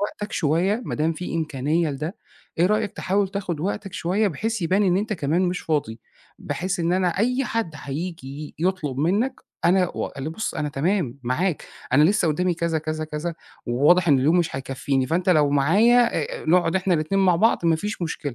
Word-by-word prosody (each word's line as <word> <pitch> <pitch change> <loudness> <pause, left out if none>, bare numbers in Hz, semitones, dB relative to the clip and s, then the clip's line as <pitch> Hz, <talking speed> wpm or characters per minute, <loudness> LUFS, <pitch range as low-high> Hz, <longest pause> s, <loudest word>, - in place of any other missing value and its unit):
وقتك 205 0 -4
شوية، 180 - +1
ما - - -3
دام 160 +2 +1
في 170 +1 -6
إمكانية 155 +1 0
لده، 155 +6 -5 0.4
إيه 175 - +5
رأيك 210 +1 0
تحاول 195 +1 0
تاخد 185 -6 -4
وقتك 195 +1 -3
شوية، 200 +4 0
بحيث 220 +3 -3
يبان 190 +5 +2
إن 185 -2 +3
أنت 215 +2 -1
كمان 165 +1 0
مش 180 -2 -1
فاضي؟ 140 -8 -2 0.4
بحيث 185 0 -3
إن 170 +1 +1
أنا 185 -1 +2
أي 250 +4 +1
حد 225 -10 -2
حييجي 150 -1 -6
يطلب 165 -7 -1
منك، 205 - 0 0.2
أنا 180 0 +3
واللي 140 +3 -4
بُص 220 +7 -4
أنا 150 - -2
تمام 145 - -1
معاك، 155 +8 -1 0.3
أنا 145 +3 +6
لسه 185 -1 +3
قدامي 175 +3 +1
كذا، 165 -1 -1
كذا، 155 0 -3
كذا، 155 +2 -4 0.3
وواضح 150 +8 +3
إن 140 -2 +5
اليوم 155 +7 +3
مش 160 -6 -1
هيكفيني، 135 0 -1
فأنت 175 +6 -1
لو 150 -4 +4
معايا، 220 - +4 0.3
آآ، - - -10
نقعد 175 +1 +3
إحنا 185 -1 +1
الاتنين 165 +5 0
مع 180 -2 +4
بعض 215 -3 +2
ما 165 -1 +4
فيش 205 +3 -4
مشكلة، 150 -5 -4
170 Hz, 185 wpm, -23 LUFS, 150-190 Hz, 0.4 s, أنا